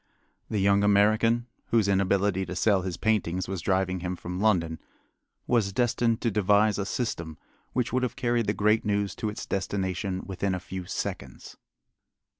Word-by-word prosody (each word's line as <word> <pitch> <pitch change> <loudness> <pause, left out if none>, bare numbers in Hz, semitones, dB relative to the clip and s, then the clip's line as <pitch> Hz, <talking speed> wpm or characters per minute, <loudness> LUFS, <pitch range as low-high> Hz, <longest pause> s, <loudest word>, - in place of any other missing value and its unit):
The 110 - -1
young 100 +1 +3
American, 110 +3 +3 0.2
whose 110 -3 +2
inability 100 0 +2
to 90 - -5
sell 100 +1 +3
his 90 -2 -4
paintings 95 -5 0
was 95 -2 -4
driving 95 -2 0
him 90 +1 -3
from 90 +1 -6
London, 85 -7 +1 0.7
was 110 -5 +1
destined 115 +1 +1
to 115 - +1
devise 105 +1 +3
a 100 - -2
system 85 -10 -3 0.4
which 125 -2 -1
would 130 - +2
have 125 - -2
carried 120 -4 0
the 105 - +2
great 105 +2 +2
news 100 -2 0
to 110 - -2
its 105 - -6
destination 95 -1 -2
within 95 0 -2
a - - -3
few 90 0 -7
seconds. - - -5
100 Hz, 165 wpm, -27 LUFS, 95-110 Hz, 0.7 s, young